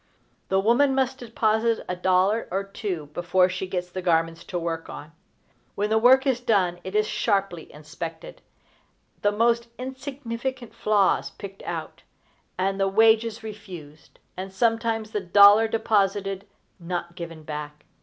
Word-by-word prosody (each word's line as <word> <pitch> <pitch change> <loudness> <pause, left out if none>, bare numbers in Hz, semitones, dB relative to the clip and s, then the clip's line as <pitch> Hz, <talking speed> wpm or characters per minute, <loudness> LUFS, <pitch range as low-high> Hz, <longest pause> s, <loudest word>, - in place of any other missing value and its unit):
The 190 - +3
woman 250 +7 +3
must 265 0 0
deposit 225 -1 0
a 180 - -2
dollar 185 +4 +2
or 195 +2 -1
two 190 -7 -5
before 180 +2 +2
she 185 +1 -4
gets 180 -1 -4
the 185 - -4
garments 165 -1 +1
to 180 - -4
work 165 -1 -4
on. 150 +2 -9 0.6
When 210 +1 -1
the 220 - +4
work 260 +4 +6
is 260 -3 +1
done 190 -7 +1
it 190 +2 -7
is 215 0 +3
sharply 195 -7 -1
inspected, 160 +2 -8 0.8
the 205 - +3
most 235 +2 +2
insignificant 260 -2 -5
flaws 205 -2 +2
picked 195 -1 -10
out, - - -6 0.6
and 195 +1 -1
the 195 - +2
wages 220 +2 +3
refused, 180 -9 -10 0.2
and 190 +1 -6
sometimes 225 +1 0
the 210 -2 -2
dollar 205 +4 +7
deposited 200 -3 0 0.3
not 170 0 -4
given 165 -2 -8
back. 150 -1 -7
195 Hz, 145 wpm, -25 LUFS, 180-225 Hz, 0.8 s, dollar